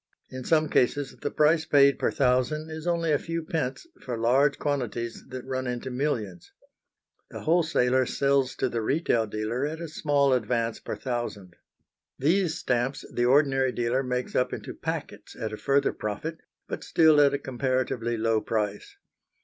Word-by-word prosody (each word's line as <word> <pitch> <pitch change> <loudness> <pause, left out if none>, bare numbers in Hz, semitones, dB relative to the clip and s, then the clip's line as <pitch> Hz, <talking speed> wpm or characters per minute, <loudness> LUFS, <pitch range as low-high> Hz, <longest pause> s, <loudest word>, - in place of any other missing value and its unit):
In 130 0 -6
some 155 -1 +3
cases 140 0 +1
the - - -1
price 155 +1 +3
paid 140 -1 +5
per - - +2
thousand 135 +4 +1
is 160 +2 -6
only 170 -2 +1
a 145 - +3
few 165 0 -4
pence 155 - -3 0.2
for 120 -2 -4
large 130 +5 +3
quantities 120 -5 -3
that 130 -1 -7
run 130 -1 -3
into 125 +1 -4
millions. 115 - -3 0.8
The - - -8
wholesaler 130 -7 +2
sells 140 -2 +1
to - - 0
the 115 - -2
retail 120 -3 +1
dealer 110 +5 -2
at 160 +2 -5
a 170 - -5
small 145 -3 +2
advance 115 -1 0
per - - -5
thousand. 120 -8 -4 0.6
Those 165 +3 +2
stamps 125 +2 -1
the 120 - +1
ordinary 135 0 +3
dealer 120 +2 0
makes 125 -1 -3
up 125 0 +2
into - - -6
packets - - -6
at 110 -1 -4
a - - -4
further 140 +3 +1
profit, 130 +11 -4 0.3
but - - -5
still 155 -3 +5
at 140 -1 +4
a - - 0
comparatively 130 -3 -1
low 110 0 +1
price. 105 -2 -3
130 Hz, 165 wpm, -27 LUFS, 120-150 Hz, 0.8 s, paid